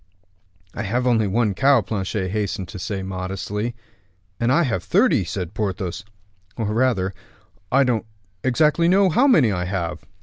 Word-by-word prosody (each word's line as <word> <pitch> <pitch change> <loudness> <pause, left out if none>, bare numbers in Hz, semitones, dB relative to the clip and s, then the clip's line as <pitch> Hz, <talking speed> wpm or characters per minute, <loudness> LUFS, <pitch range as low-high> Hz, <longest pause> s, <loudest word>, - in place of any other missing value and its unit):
"I - - -4
have 120 +5 -1
only 115 -4 +3
one 105 +1 +1
cow," 135 +3 +4
Planchet 95 -2 -3
hastened 100 -2 -2
to 95 - -8
say 100 -1 -4
modestly. 95 +4 -4 0.6
"And 120 +1 +1
I 170 +6 +4
have 115 - -1
thirty," - - +3
said 90 0 -5
Porthos; 95 -2 -3 0.5
"or 105 -2 -1
rather, 110 -6 +1 0.6
I 140 +2 +5
don't 115 -4 0 0.4
exactly 150 +6 +3
know 190 +1 +4
how 255 - +4
many 145 - +5
I 90 -2 -2
have." 90 -2 -3
110 Hz, 155 wpm, -22 LUFS, 95-125 Hz, 0.6 s, I